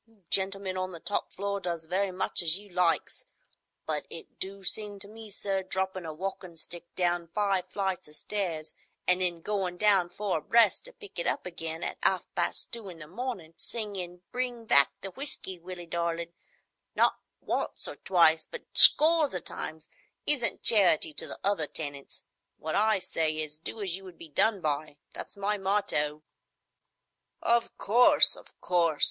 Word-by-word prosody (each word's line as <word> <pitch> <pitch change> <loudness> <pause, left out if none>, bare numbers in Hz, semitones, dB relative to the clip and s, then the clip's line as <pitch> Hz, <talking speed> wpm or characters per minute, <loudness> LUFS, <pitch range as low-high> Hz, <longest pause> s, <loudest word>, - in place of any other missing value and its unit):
You 220 -4 -28
gentlemen 190 -1 +2
on 185 0 -3
the 170 - -7
top 205 - -2
floor 200 +1 -3
does 170 -3 -4
very 190 +4 0
much 185 0 +1
as 170 0 +2
you 205 0 -13
likes, 175 -2 0 0.6
but 150 -2 -3
it 165 - -11
do 195 +1 -5
seem 205 +1 -3
to 200 - -9
me, 220 +1 -11
sir, 195 -1 -2
droppin' 190 -1 -3
a - - -4
walkin' 180 +1 -6
stick 175 +1 -6
down 175 -1 0
five 195 0 0
flights 190 -5 -2
o' - - -16
stairs 165 -1 -3 0.3
an' 180 0 +3
then 175 -2 -1
goin' 190 -2 -2
down 195 -3 +4
four 190 -1 -2
abreast 225 - +3
to - - -7
pick 420 -3 -10
it - - -1
up - - -1
again 165 -2 -5
at - - -4
half - - +3
past - - -2
two 225 -4 -5
in 175 - -10
the 155 - -9
mornin', 185 -2 -6
singin', 185 -6 -5
'Bring 245 -2 -2
back 140 -9 +6
the 195 - -6
whiskey, 190 -8 -6
Willie 175 0 -8
darlin','—not 170 - -3 0.2
once - - -3
or - - -6
twice, 165 -3 +4
but 485 - -9
scores 310 - +7
o' - - 0
times,—isn't 175 - -5
charity 180 -8 +6
to - - 0
the - - -6
other 195 -6 +1
tenants. 145 -3 -7 0.3
What 155 - -4
I 215 0 +3
say 160 -4 -1
is, 155 -1 -3
'Do 205 +7 -6
as 185 -3 +1
you 195 0 -9
would 180 -3 -12
be 165 - -12
done 200 +6 +2
by.' 150 -1 -2 0.2
That's - - -6
my 205 +1 -1
motto." 155 -7 0 1.2
"Of 235 0 +2
course! 240 +5 +7
of - - -16
course! 170 -4 +1
185 Hz, 170 wpm, -29 LUFS, 165-205 Hz, 1.2 s, scores